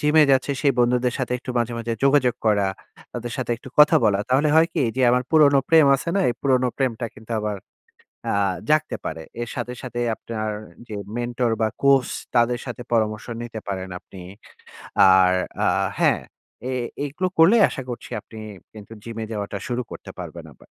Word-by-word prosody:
জিমে 150 +1 +5
যাচ্ছে 135 +1 +2
সেই 140 -2 +4
বন্ধুদের 125 +1 +2
সাথে 125 -1 -2
একটু 130 - -7
মাঝে, 120 0 -1
মাঝে 115 0 -3
যোগাযোগ 135 -3 +4
করা। 105 -2 +3 0.5
তাদের 120 -1 -5
সাথে 125 -3 -3
একটু 130 - -12
কথা 150 0 +7
বলা। 100 -2 +3
তাহলে 135 +4 +3
হয় 160 +1 +6
কি 160 - 0 0.2
যে - - 0
আমার 125 +1 +2
পুরনো 145 -3 +6
প্রেম 160 -3 +6
আছে 170 - -6
না? 195 - +3
এই 120 - 0
পুরনো 130 -2 +2
প্রেমটা 120 -3 -1
কিন্তু 110 +1 -16
আবার 105 -1 -2 0.8
আ - - 0 0.4
জাগতে 155 0 +2
পারে। 80 - -4 0.2
এর 120 - -4
সাথে, 125 0 -4
সাথে 120 -1 -5 0.2
আপনার 110 -1 -5 0.4
যে 110 - -8 0.2
মেন্টর 120 0 -1
বা 110 - +3 0.2
কোচ 135 -3 +5 0.3
তাদের 120 +1 +3
সাথে 125 -1 -6
পরামর্শ 110 -2 0 0.2
নিতে 115 -2 -6
পারেন 95 -1 -4
আপনি। 95 - -14 1.0
আর 90 -1 +5 0.3
আ - - +3 0.3
হ্যাঁ, - - +3 0.5
এ - - -2 0.3
এগুলো 150 +6 -2
করলে 170 +8 +7
আশা 135 - -6
করছি 120 0 -7
আপনি 110 - -15 0.4
কিন্তু 110 0 -12
জিমে 115 -1 -5
যাওয়াটা 100 -1 -4
শুরু 125 +1 -1
করতে - - -9
পারবেন - - -8
আবার। - - -21
120 Hz, 180 wpm, -23 LUFS, 110-135 Hz, 1.0 s, কথা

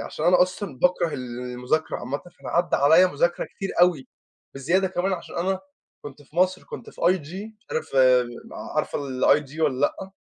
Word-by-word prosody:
عشان 155 - -4
أنا 180 +1 +6
أصلًا 180 -5 -4
باكره 180 +1 +2
ال 125 -3 -6
المذاكرة 125 +5 -2
عامةً، 135 +3 -4
فأنا 175 - -13
عدّى 175 +1 +2
عليَّ 160 +6 +6
مذاكرة 175 +2 0
كتير 195 - -6
أوي، 175 -6 +3 0.5
بزيادة 170 +8 +1
كمان 190 +1 -1
عشان 175 - -6
أنا 190 +2 0 0.4
كنت 145 0 -10
في 145 +3 -21
مصر 185 +1 +2
كنت - - -9
في - - -15
IG، 185 +5 -1
مش 230 - -36
عارف 155 - -3
آآ، 125 -1 +5 0.5
عارفة - - 0
الIG 140 +2 +1
والَّا 150 -5 +2
لأ؟ 190 +6 -1
165 Hz, 175 wpm, -24 LUFS, 135-185 Hz, 0.5 s, أنا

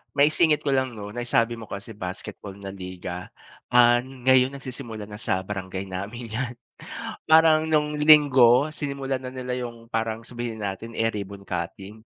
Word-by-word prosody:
maisingit 150 +1 +4
ko 140 - 0
lang 130 -3 0
'no, 105 -1 -7
naisabi 120 0 0
mo 110 - -9
kasi 100 +3 -7
basketball 100 0 -7
na 100 -1 -8
liga, 90 -1 -7 0.5
ah, 120 0 +7
ngayon 130 +1 +2
nagsisimula 125 -5 -7
na 105 0 -8
sa 95 0 -1
barangay 95 -1 -5
namin 105 +5 -6
'yan. 120 +2 -3 0.7
Parang 160 0 +6
nung 150 -1 +2
linggo, 145 -3 +6
sinimulan 140 -3 -3
na 125 - -5
nila 125 -1 -3
'yung 115 -1 -10
parang, 115 0 -2
sabihin 120 -2 -5
na 100 -2 -2
natin, 115 +4 -10
eh, 115 0 +2
ribbon 100 -1 -6
cutting, 95 +4 -5
120 Hz, 160 wpm, -25 LUFS, 100-135 Hz, 0.7 s, ah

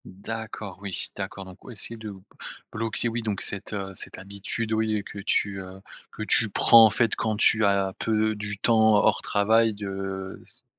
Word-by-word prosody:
D'accord. 110 0 -7
Oui 100 -2 -5 0.2
d'accord, 95 - -6
donc 95 -1 -14
oui 125 - -10
si 115 +3 -2
de 110 -1 -8
b 100 -2 -10 0.5
bloquer 115 +1 -1
oui 115 +1 -2
donc 105 -3 -3
cette, 100 0 -4
heu, 100 -2 -4
cette - - -5
habitude 100 +3 -5
oui, 110 0 +1
heu, - - -7
que 100 - -9
tu, 100 0 0
heu, 95 +1 -10 0.3
que - - -6
tu - - +4
prends 115 -1 +7
en - - +5
fait 115 +1 +1
quand 110 -1 -1
tu 110 +1 +4
as 100 -1 +1
peu 110 -1 +1
du 105 0 -3
temps 110 0 +4
hors 100 - +3
travail 110 +2 +2
de 95 -1 -6
s - - -15
105 Hz, 195 wpm, -25 LUFS, 95-110 Hz, 0.5 s, prends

